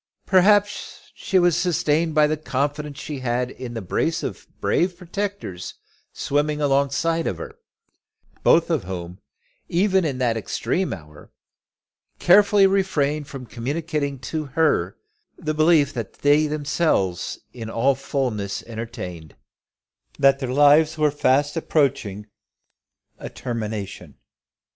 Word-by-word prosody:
Perhaps 205 +2 +2
she 190 - -1
was 175 -3 +4
sustained 165 -2 +1
by 150 -1 +6
the 155 +1 +1
confidence 145 0 -3
she 145 -1 -6
had 125 0 -1
in 125 -2 -8
the 110 - -4
brace 90 - -1
of - - -6
brave 180 0 +1
protectors 190 - -5 0.4
swimming 150 +1 -1
alongside 145 +4 +1
of 90 - -2
her, - - -8 0.9
both 170 +1 +4
of 145 - 0
whom, 90 0 -6 0.5
even 190 +2 +2
in 140 -5 -2
that 120 -3 +1
extreme 125 - -2
hour, 75 -3 -10 0.9
carefully 200 +2 +5
refrained 155 -7 +1
from 135 -3 -8
communicating 140 +5 -3
to 155 +5 -4
her 160 +4 +1 0.4
the 155 -3 -3
belief 155 -2 +3
which 115 -5 -5
they 145 +2 +4
themselves 145 - 0 0.2
in 115 -3 -7
all 130 +5 +2
fulness 125 -7 -3
entertained, 110 - -7 0.8
that 135 0 +4
their 130 -2 -3
lives 145 +3 +5
were 150 -1 +3
fast 145 +1 +1
approaching 135 - 0
to 105 - -29 0.9
a - - -6
termination. 105 - -5
145 Hz, 125 wpm, -23 LUFS, 115-160 Hz, 0.9 s, by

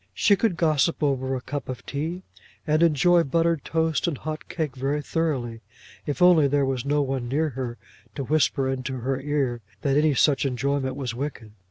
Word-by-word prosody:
She 205 - +4
could 195 -4 0
gossip 155 -1 +2
over 135 -2 0
a 130 - -4
cup 145 +1 -5
of 130 - -6
tea, 160 +6 -4 0.4
and 155 +1 +2
enjoy 170 +2 +4
buttered 165 +1 +1
toast 160 0 0
and 160 -5 -1
hot 155 +2 -6
cake 155 -7 -3
very 135 +3 -1
thoroughly, 140 -8 -2 0.5
if 150 +5 0
only 170 -5 +6
there 140 0 +2
was 130 -2 -2
no 145 +1 +1
one 130 -3 -3
near 155 +4 +1
her 125 -3 -5 0.4
to 140 - -3
whisper 140 -1 +1
into 130 -1 -3
her 135 +2 -1
ear 135 -4 -1 0.2
that 140 0 +2
any 150 -1 +3
such 140 +1 +3
enjoyment 135 0 -1
was 130 -4 -4
wicked. 125 -4 -5
140 Hz, 185 wpm, -25 LUFS, 130-155 Hz, 0.5 s, only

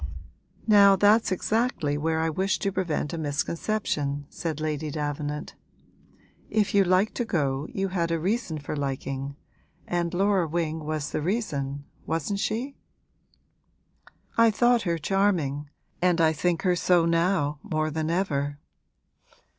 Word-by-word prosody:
'Now, 200 -2 +7
that's 205 +2 +4
exactly 185 -6 0
where 160 +2 0
I 160 - +1
wish 190 +5 0
to 200 - -1
prevent 175 -5 -2
a 165 - -3
misconception,' 145 -1 -2
said 160 -3 -4
Lady 155 0 -2
Davenant. 150 0 -4 1.0
'If 215 -2 +1
you 200 -1 +5
liked 185 +3 +2
to 240 - +1
go 145 - -1
you 195 0 -1
had 170 -3 -1
a 165 0 0
reason 190 -1 -1
for 145 +1 -5
liking, 135 0 -3 0.5
and 170 -1 -1
Laura 190 -1 +2
Wing 160 -1 -2
was 155 -1 -3
the - - -1
reason, 145 - -2 0.2
wasn't 165 +5 -1
she?' 240 +7 -2 1.6
'I 230 0 +7
thought 240 +2 +3
her 170 - +1
charming, 160 -6 0 0.3
and 180 -1 +3
I 160 -1 +4
think 170 +2 0
her 180 -2 +3
so 175 -1 +3
now 165 -3 +1
more 155 -6 -1
than 160 +1 -2
ever.' 145 -6 -1
165 Hz, 140 wpm, -26 LUFS, 150-195 Hz, 1.6 s, Now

